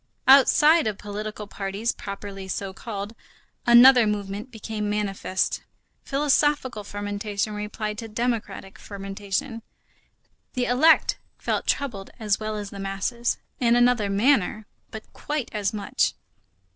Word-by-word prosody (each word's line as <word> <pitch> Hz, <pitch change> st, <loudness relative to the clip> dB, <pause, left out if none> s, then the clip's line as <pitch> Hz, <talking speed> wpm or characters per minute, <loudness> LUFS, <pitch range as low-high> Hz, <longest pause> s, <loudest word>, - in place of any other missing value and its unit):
Outside 295 Hz, +3 st, +6 dB
of 210 Hz, -2 st, -2 dB
political 210 Hz, +1 st, -6 dB
parties 200 Hz, +3 st, -3 dB
properly 200 Hz, -1 st, -7 dB
so 190 Hz, 0 st, -4 dB
called, 205 Hz, 0 st, -6 dB, 0.5 s
another 240 Hz, 0 st, +8 dB
movement 205 Hz, +2 st, -3 dB
became 220 Hz, -2 st, -4 dB
manifest. 200 Hz, -2 st, -1 dB, 0.4 s
Philosophical 280 Hz, -4 st, +1 dB
fermentation 205 Hz, +1 st, -3 dB
replied 210 Hz, +1 st, -4 dB
to 230 Hz, -, -6 dB
democratic 215 Hz, -4 st, -3 dB
fermentation. 200 Hz, +3 st, -4 dB, 0.9 s
The 250 Hz, -1 st, +1 dB
elect 290 Hz, +7 st, +4 dB, 0.2 s
felt -, -, -2 dB
troubled 225 Hz, -9 st, -1 dB
as 210 Hz, -3 st, 0 dB
well 215 Hz, 0 st, -3 dB
as 205 Hz, -1 st, -6 dB
the 200 Hz, -, -8 dB
masses; 195 Hz, +5 st, -2 dB, 0.2 s
in 235 Hz, -1 st, +3 dB
another 240 Hz, -4 st, +3 dB
manner, 215 Hz, 0 st, +2 dB, 0.2 s
but 220 Hz, -, -8 dB
quite 295 Hz, -4 st, -4 dB
as 205 Hz, -2 st, -1 dB
much. 210 Hz, -2 st, 0 dB
210 Hz, 120 wpm, -25 LUFS, 200-240 Hz, 0.9 s, another